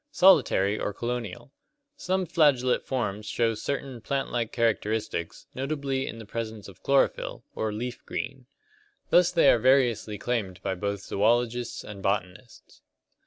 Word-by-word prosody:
Solitary 110 Hz, -, +4 dB
or 105 Hz, -, -3 dB
colonial. 120 Hz, 0 st, -4 dB, 0.4 s
Some 185 Hz, +1 st, -1 dB
flagellate 140 Hz, -7 st, +2 dB
forms 105 Hz, -5 st, -2 dB
show 115 Hz, 0 st, +1 dB
certain 130 Hz, +2 st, -4 dB
plant 140 Hz, +3 st, -2 dB
like 120 Hz, -2 st, -1 dB
characteristics, 110 Hz, -6 st, -1 dB
notably 135 Hz, -1 st, -2 dB
in -, -, -6 dB
the 115 Hz, -, -9 dB
presence 110 Hz, -1 st, -5 dB
of 95 Hz, -, -14 dB
chlorophyl, 140 Hz, 0 st, +1 dB
or 110 Hz, -1 st, -2 dB
leaf 120 Hz, +4 st, -5 dB
green. 130 Hz, -2 st, -5 dB, 0.6 s
Thus 175 Hz, 0 st, +5 dB
they 170 Hz, -2 st, +4 dB
are 120 Hz, -, +3 dB
variously 120 Hz, -4 st, +3 dB
claimed 100 Hz, -5 st, -2 dB
by -, -, -1 dB
both 100 Hz, +1 st, -3 dB
zoologists 120 Hz, +3 st, 0 dB
and 100 Hz, -2 st, -9 dB
botanists. 100 Hz, +3 st, -4 dB
115 Hz, 135 wpm, -27 LUFS, 105-135 Hz, 0.6 s, Thus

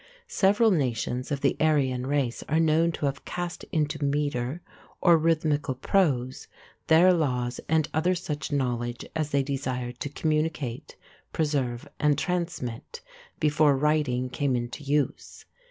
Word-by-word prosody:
Several 210 Hz, -, +3 dB
nations 125 Hz, -, -1 dB
of 140 Hz, -1 st, -1 dB
the 140 Hz, -, +2 dB
Aryan 135 Hz, -5 st, +1 dB
race 135 Hz, -4 st, -1 dB
are 155 Hz, +1 st, +2 dB
known 165 Hz, +1 st, +3 dB
to 150 Hz, -, -3 dB
have 140 Hz, 0 st, -2 dB
cast 175 Hz, -1 st, -5 dB
into 150 Hz, -1 st, -1 dB
metre 140 Hz, 0 st, -1 dB, 0.4 s
or 170 Hz, -2 st, +6 dB
rhythmical 155 Hz, -4 st, +1 dB
prose 130 Hz, -4 st, 0 dB, 0.4 s
their 175 Hz, +3 st, +6 dB
laws 125 Hz, -7 st, -1 dB
and 160 Hz, -1 st, +3 dB
such 160 Hz, -3 st, -1 dB
other 145 Hz, -, 0 dB
knowledge 120 Hz, -2 st, -2 dB
as 155 Hz, -2 st, -1 dB
they 140 Hz, -1 st, +1 dB
desired 130 Hz, -3 st, -3 dB
to 145 Hz, -, -3 dB
communicate, 155 Hz, -4 st, -2 dB, 0.4 s
preserve, 135 Hz, -6 st, -1 dB
and 150 Hz, -2 st, +3 dB
transmit, 175 Hz, -, -3 dB, 0.4 s
before 150 Hz, -2 st, +3 dB
writing 145 Hz, -4 st, +1 dB
came 140 Hz, -2 st, 0 dB
into 120 Hz, +4 st, -4 dB
use. 145 Hz, 0 st, -2 dB
145 Hz, 135 wpm, -27 LUFS, 130-160 Hz, 0.4 s, or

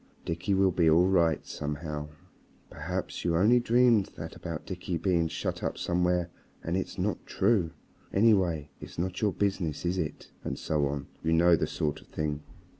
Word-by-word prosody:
"Dickie 85 Hz, +4 st, -1 dB
will 95 Hz, 0 st, +4 dB
be 85 Hz, -2 st, +3 dB
all 85 Hz, +3 st, +5 dB
right 85 Hz, -5 st, +2 dB
somehow. 75 Hz, 0 st, -4 dB, 0.6 s
"Perhaps -, -, -4 dB
you 85 Hz, -1 st, +1 dB
only 110 Hz, +7 st, +5 dB
dreamed 120 Hz, -3 st, +4 dB
that -, -, -7 dB
about 80 Hz, -3 st, -6 dB
Dickie 90 Hz, -2 st, -3 dB
being 85 Hz, -3 st, +1 dB
shut -, -, -3 dB
up -, -, -2 dB
somewhere 90 Hz, 0 st, 0 dB, 0.3 s
and 85 Hz, -, -1 dB
it's 95 Hz, -, -3 dB
not -, -, -1 dB
true. 100 Hz, -4 st, +2 dB, 0.4 s
"Anyway, 95 Hz, -9 st, +3 dB
it's -, -, -10 dB
not 90 Hz, +2 st, -2 dB
your 105 Hz, -2 st, +3 dB
business, 95 Hz, -6 st, -1 dB
is 90 Hz, +2 st, 0 dB
it?" 75 Hz, -3 st, -5 dB
And -, -, -3 dB
so 75 Hz, -2 st, 0 dB
on. 70 Hz, 0 st, -3 dB, 0.2 s
You 80 Hz, 0 st, +2 dB
know 85 Hz, +1 st, +6 dB
the -, -, -1 dB
sort 75 Hz, -2 st, -2 dB
of -, -, -19 dB
thing. 75 Hz, -1 st, -3 dB
85 Hz, 175 wpm, -29 LUFS, 80-95 Hz, 0.6 s, know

